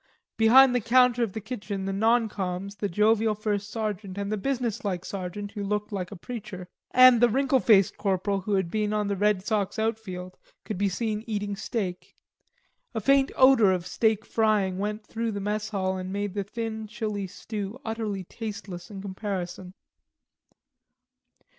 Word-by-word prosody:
Behind 250 +4 +7
the 245 - +1
counter 245 +1 +4
of 225 -5 0
the - - -3
kitchen 205 -3 -5
the 195 - -2
non 225 +3 +3
coms, 195 0 -4
the 205 - -2
jovial 215 +3 +3
first 210 -1 -2
sergeant, 210 -3 -4
and 200 0 -3
the - - +1
businesslike 215 -6 -2
sergeant 200 +1 -5
who 205 - -5
looked 210 +2 -2
like 185 -3 -3
a - - -6
preacher, 190 -3 -7 0.2
and 255 -2 +7
the 240 - +6
wrinkled 265 +2 +2
faced 200 -4 +5
corporal 195 0 0
who 200 +2 -1
had 190 -3 0
been 210 -1 0
on 210 -1 0
the 200 - 0
Red 205 -1 +1
Sox 210 -2 -1
outfield, 215 -5 -3 0.3
could 210 - -4
be 200 -1 +2
seen 215 +2 -2
eating 205 -2 -2
steak. 195 -4 -4 0.8
A - - +1
faint 275 +5 +3
odor 260 -7 +6
of 180 -2 -1
steak 220 +3 +1
frying 210 -4 +1
went 210 +1 -3
through 225 0 -3
the 200 - -3
mess 210 +2 -2
hall 190 -3 -1
and 185 0 -5
made 205 -1 -2
the 200 -1 -2
thin 220 0 -5
chilly 210 -3 -3
stew 210 +4 -6
utterly 220 -4 -3
tasteless 195 -4 -7
in 195 -2 -8
comparison. 190 -2 -5
210 Hz, 170 wpm, -27 LUFS, 195-225 Hz, 0.8 s, Behind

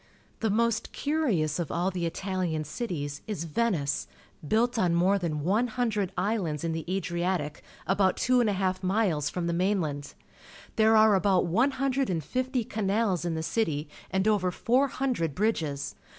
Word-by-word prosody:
The 220 - 0
most 230 +1 +1
curious 225 - 0
of 170 - -3
all 180 +3 0
the 175 -2 -1
ItaUan 180 -4 -2
cities 150 - -4
is 200 -7 -3
Veincc, 165 -4 0 0.4
built 235 - +2
on 175 -4 +2
more 190 +4 +3
than 155 -5 -2
one 210 +9 +2
hundred 220 -5 -1
islands 180 -6 -1
in 165 - -1
the 160 0 -3
Adriatic, 175 -4 -2 0.2
about 190 0 +2
two 255 0 +3
and 225 - +2
a - - +1
half 185 -1 -1
miles 185 -6 +1
fiom 180 -2 -3
the 170 - 0
mainland. 170 -6 -1 0.6
There 220 0 +5
are 215 -1 +6
about 190 -1 +3
one 225 +11 +3
hundred 270 -1 0
and 165 -4 -1
fifty 255 - -1
canals 205 -4 0
in 170 -2 -1
the 160 - -3
city 160 -7 -1 0.2
and 190 +2 0
over 205 -4 +2
four 250 +9 +2
hundred 250 - -1
bridges. 165 -9 -1
190 Hz, 165 wpm, -28 LUFS, 165-220 Hz, 0.6 s, are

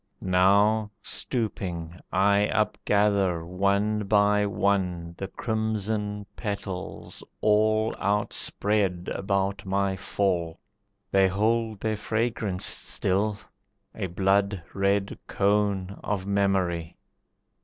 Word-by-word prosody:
Now, 100 +4 +3
stooping, 90 -8 -3
I 100 +2 +3
upgather, 100 -4 +1
one 100 +4 0
by 105 0 +3
one, 90 -3 0
The 95 - -3
crimson 105 -1 -2
petals, 100 -3 -5 0.2
all 110 +1 +3
Outspread 100 -2 0
about 100 0 -1
my 100 0 0
fall. 90 -3 -1 0.5
They 95 -1 +5
hold 110 +2 0
their 110 -1 -1
fragrance 110 -3 -1
still, 100 +2 +1 0.6
a 100 -4 -3
blood 95 +1 +1
red 100 0 0
cone 100 -1 0
Of 100 -2 -2
memory. 95 -4 0
100 Hz, 90 wpm, -26 LUFS, 95-105 Hz, 0.6 s, They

